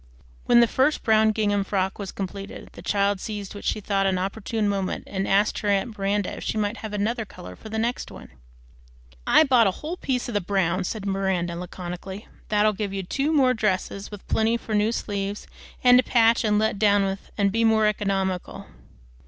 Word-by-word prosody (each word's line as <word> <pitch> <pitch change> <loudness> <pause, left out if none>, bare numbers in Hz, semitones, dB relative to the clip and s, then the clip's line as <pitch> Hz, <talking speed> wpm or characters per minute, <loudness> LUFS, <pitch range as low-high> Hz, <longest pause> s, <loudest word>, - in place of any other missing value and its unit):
When 240 0 +6
the 235 - +5
first 265 +6 +1
brown 220 -1 +4
gingham 205 -2 +1
frock 190 0 -1
was 195 -2 -5
completed, 195 +1 -7
the - - -11
child 200 -1 +1
seized 205 -1 -6
what 205 - -9
she - - 0
thought 195 -1 0
an 190 -1 +1
opportune 205 +3 -2
moment 195 -2 -2
and 195 0 -3
asked 200 +2 +2
her 210 - -4
aunt 205 +3 0
Miranda 200 0 -1
if - - -7
she - - -2
might 210 +1 -1
have 220 - -7
another 220 +3 -1
color 90 - -11
for 220 - -11
the 220 - -4
next 235 +3 -2
one. - - -12 1.0
"I - - +6
bought 250 -7 +4
a 190 - -2
whole 340 +4 -3
piece 255 -6 -2
of 240 - -5
the 205 - +1
brown," 185 -1 0
said 210 +1 -4
Miranda 190 -3 -1
laconically. 180 +3 -7 0.2
"That'll 215 0 +3
give 205 -1 -3
you 195 -1 -3
two 275 - -1
more 265 -5 +4
dresses, 200 -2 -2
with 205 -2 -11
plenty 225 +1 +2
for 225 - -6
new 210 +1 +2
sleeves, 200 -2 -3 0.4
and 250 0 +7
to - - +3
patch 230 0 +3
and 210 -1 +2
let 215 -1 0
down 205 -1 +4
with, 195 0 -4
an' 200 -1 +3
be 225 +3 0
more 220 -1 +4
economical." 195 -3 -1
205 Hz, 200 wpm, -24 LUFS, 195-220 Hz, 1.0 s, and